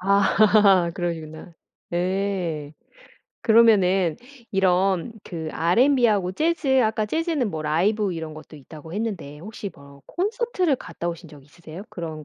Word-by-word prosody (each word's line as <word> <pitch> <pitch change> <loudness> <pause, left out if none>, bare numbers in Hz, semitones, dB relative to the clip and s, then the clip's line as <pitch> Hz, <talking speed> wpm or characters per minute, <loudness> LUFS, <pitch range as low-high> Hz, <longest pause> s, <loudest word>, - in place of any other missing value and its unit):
아 200 -1 +4
그러시구나. 165 -1 -5 0.4
예. 180 -4 -2 0.7
그러면은 195 -7 +4 0.3
이런 190 +1 +1
그 160 -3 -6
알앤비하고 210 - +2
재즈 275 - +1
아까 220 -1 0
재즈는 315 - -1
뭐 155 -1 -4
라이브 190 +7 +1
이런 160 -2 -6
것도 155 0 -12
있다고 155 +3 -12
했는데 190 -9 -4
혹시 205 +3 -7
뭐 140 -1 -16
콘서트를 380 - -1
갔다 175 - -6
오신 170 0 -7
적 150 -2 -14
있으세요? 160 +5 -11
그런 160 -3 -7
185 Hz, 285 characters per minute, -23 LUFS, 160-220 Hz, 0.7 s, 아